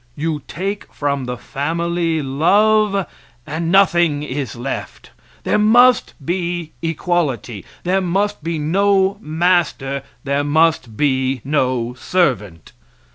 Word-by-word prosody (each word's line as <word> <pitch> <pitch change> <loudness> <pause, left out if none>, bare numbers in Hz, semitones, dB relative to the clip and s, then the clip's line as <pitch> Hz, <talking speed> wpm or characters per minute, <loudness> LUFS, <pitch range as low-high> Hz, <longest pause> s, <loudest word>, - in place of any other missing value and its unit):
You 155 0 -2
take 195 +3 -4
from 140 -2 -2
the 125 0 -4
family 165 +3 -2
love, 200 +8 +3 0.4
and 165 +3 -3
nothing 175 -6 +3
is 135 -2 -4
left. 125 +3 -6 0.3
There - - +1
must 240 +3 +4
be 175 -2 -2
equality; 155 - -2 0.2
there 190 +2 +1
must 195 +1 -1
be 165 0 -2
no 195 +5 +2
master; 155 -5 0 0.2
there 140 0 0
must 145 -6 +1
be 130 -3 +1
no 130 -4 0
servant. 120 - -1
160 Hz, 110 wpm, -19 LUFS, 140-185 Hz, 0.4 s, must